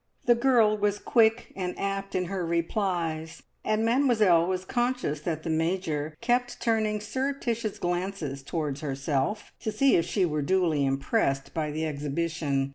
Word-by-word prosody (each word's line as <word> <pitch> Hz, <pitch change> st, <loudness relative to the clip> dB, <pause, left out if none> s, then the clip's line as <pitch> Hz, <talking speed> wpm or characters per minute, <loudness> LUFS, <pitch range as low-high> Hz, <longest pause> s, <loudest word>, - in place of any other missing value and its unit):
The 240 Hz, -, +6 dB
girl 235 Hz, -3 st, +4 dB
was 205 Hz, 0 st, +1 dB
quick 225 Hz, +2 st, +2 dB
and 180 Hz, -2 st, -3 dB
apt 195 Hz, 0 st, -3 dB
in 180 Hz, -1 st, +1 dB
her 190 Hz, 0 st, -3 dB
replies, 170 Hz, -2 st, -2 dB, 0.2 s
and 215 Hz, +1 st, +1 dB
Mademoiselle 225 Hz, -9 st, +4 dB
was 185 Hz, 0 st, -2 dB
conscious 240 Hz, -, -1 dB
that 160 Hz, -1 st, -3 dB
the -, -, -4 dB
Major 160 Hz, -2 st, -1 dB
kept 245 Hz, +1 st, 0 dB
turning 215 Hz, -2 st, +1 dB
surreptitious 235 Hz, -2 st, -2 dB
glances 175 Hz, -5 st, -3 dB
towards 145 Hz, -1 st, -3 dB
herself, 140 Hz, +7 st, -2 dB
to 220 Hz, -, -3 dB
see 275 Hz, +4 st, +4 dB
if 165 Hz, -, +2 dB
she 195 Hz, -3 st, +1 dB
were 150 Hz, -3 st, -1 dB
duly 165 Hz, -2 st, +2 dB
impressed 135 Hz, 0 st, 0 dB
by 155 Hz, -2 st, -1 dB
the 155 Hz, +2 st, -2 dB
exhibition. 145 Hz, -1 st, -1 dB
180 Hz, 150 wpm, -27 LUFS, 155-220 Hz, 0.2 s, The